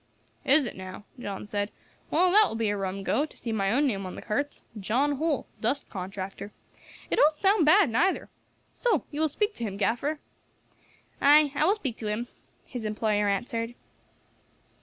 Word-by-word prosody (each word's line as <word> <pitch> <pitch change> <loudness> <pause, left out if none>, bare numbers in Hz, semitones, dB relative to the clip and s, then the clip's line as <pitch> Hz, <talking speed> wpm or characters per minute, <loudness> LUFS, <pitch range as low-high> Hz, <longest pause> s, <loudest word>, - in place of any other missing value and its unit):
"Is 280 +1 +6
it - - -4
now?" 185 +1 -8 0.2
John 200 -4 -5
said. 205 0 -2 0.4
"Well, 360 +3 +3
that 420 +2 +6
will - - -5
be 225 -2 0
a - - -1
rum 195 0 -3
go, 275 - +1
to 310 - -8
see 230 - -4
my 195 -3 +1
own 280 +6 +3
name 200 -8 -1
on 185 - -7
the - - -8
carts, 285 +7 -2 0.2
'John 265 +8 +1
Holl, 310 -2 0
Dust 270 +6 -1
Contractor.' 195 +1 -6 0.6
It - - +1
don't 305 +1 +5
sound 385 -1 +3
bad, 390 +3 +6
neither. 350 +12 +1 0.4
So 450 - 0
you 295 - -3
will 315 - +2
speak 420 +8 -1
to 235 - -7
him, 200 -3 -3
gaffer?" 245 +9 0 1.0
"Ay, 295 +1 +6
I 300 +1 +2
will 390 +5 +4
speak 265 - -4
to 220 - -5
him," 220 +3 -2 0.4
his 245 -3 -6
employer 210 -1 0
answered. 230 +3 -2
240 Hz, 180 wpm, -27 LUFS, 205-300 Hz, 1.0 s, Is